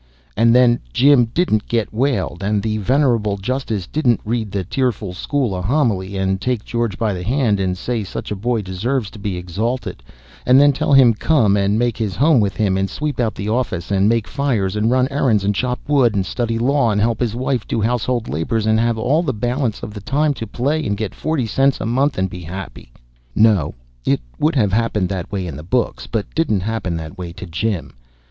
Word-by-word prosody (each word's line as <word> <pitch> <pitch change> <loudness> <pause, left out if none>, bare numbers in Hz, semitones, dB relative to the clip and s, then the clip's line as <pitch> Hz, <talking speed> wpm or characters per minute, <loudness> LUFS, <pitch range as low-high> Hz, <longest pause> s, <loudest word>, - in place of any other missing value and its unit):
And 115 +3 +4
then 125 -1 +5
Jim 135 - +5
didn't 115 -3 0
get 115 -3 -1
whaled, 120 -7 -1
and 100 0 0
the 110 -1 -1
venerable 115 -3 +1
justice 110 -2 -3
didn't 125 - +1
read 110 -2 -2
the 100 -1 -2
tearful 105 -3 -2
school 130 +3 -1
a 90 - -3
homily, 100 -5 0
and 95 0 0
take 125 -2 -1
George 115 -5 -2
by 110 -3 0
the 90 - -5
hand 115 0 +1
and 90 -1 -1
say 120 +2 -2
such 95 - -6
a - - -1
boy 115 +2 -1
deserved 105 +5 -2
to 105 - -10
be 100 -3 -3
exalted, 105 +9 -3 0.4
and 130 +2 +5
then 145 0 +6
tell 140 - 0
him 130 -4 +7
to 105 - -16
come 115 -11 +3
and 100 +1 +1
make 120 -1 0
his 105 -5 -2
home 145 -1 +4
with 100 -3 0
him, 100 -4 +1
and 95 0 0
sweep 150 -2 -4
out 115 -3 0
the 100 - -5
office, 110 -7 -2
and 100 +1 +3
make 115 -2 +1
fires, 120 -9 -1
and 105 +2 +1
run 130 +1 +3
errands, 125 -8 +2
and 100 +1 +1
chop 125 +4 -1
wood, 130 -7 +3
and 95 -2 0
study 115 0 -2
law, 125 +1 +2
and 105 -1 +1
help 115 +1 +1
his 115 -3 -1
wife 130 -2 -1
do - - -1
household 120 +1 0
labors, 105 +9 -1
and 110 0 +3
have 115 0 +1
all 140 +9 +2
the 160 -6 -1
balance 120 +1 -2
of 105 - -6
the 105 - -8
time 145 +7 +1
to 115 -4 -6
play, 145 +6 -1
and 100 -1 -1
get 110 -2 -3
forty 155 -5 -1
cents 135 +5 +1
a - - -3
month, 135 +5 +1
and 95 +1 +1
be 90 -1 -8
happy. 90 -6 -8 0.4
No; 105 -9 +3 0.3
it - - +1 0.2
would 155 +2 +2
have 105 -7 +2
happened 105 -4 +1
that 95 -1 -4
way 95 -3 -2
in 80 -5 -5
the 75 - -7
books, 120 +10 -1
but 110 -3 -2
didn't 135 - +1
happen 100 -4 -2
that 80 +1 -8
way 85 -2 -5
to 95 +2 -8
Jim. 90 +2 -3
110 Hz, 220 wpm, -19 LUFS, 100-125 Hz, 0.4 s, him